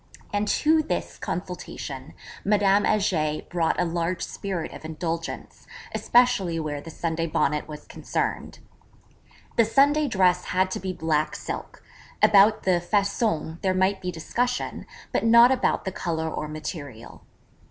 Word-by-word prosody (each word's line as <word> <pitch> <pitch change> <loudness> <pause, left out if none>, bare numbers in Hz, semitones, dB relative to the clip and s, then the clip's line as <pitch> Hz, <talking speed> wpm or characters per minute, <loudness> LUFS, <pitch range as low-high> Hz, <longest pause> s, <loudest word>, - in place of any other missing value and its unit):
And 205 +1 0
to 315 +6 +3
this 310 - -4
consultation 165 -6 -6 0.3
Madame 200 0 +3
Heger 165 -8 +1
brought 170 -2 0
a 180 - +2
large 170 +1 -2
spirit 190 -5 -4
of - - -10
indulgence, 165 +1 -5 0.3
especially 240 -9 +3
where 150 -2 -3
the 165 - -10
Sunday 165 0 -2
Bonnet 150 -1 0
was 150 -1 -9
concerned. - - -3 1.0
The 230 - +6
Sunday 285 +6 +3
Dress 185 -6 +2
had 185 +1 +1
to - - -2
be 190 0 -3
black 160 -3 0
silk - - -7 0.4
about 210 +1 +6
the 180 -2 +2
façon 195 -4 0
there 190 -2 +1
might 190 +1 +1
be 180 -1 -3
discussion, 245 +9 -2 0.2
but - - 0
not 235 +2 +7
about 265 - +1
the 190 - -2
colour 160 -3 -2
or 150 - -4
material. 150 -6 -7
180 Hz, 140 wpm, -25 LUFS, 160-205 Hz, 1.0 s, not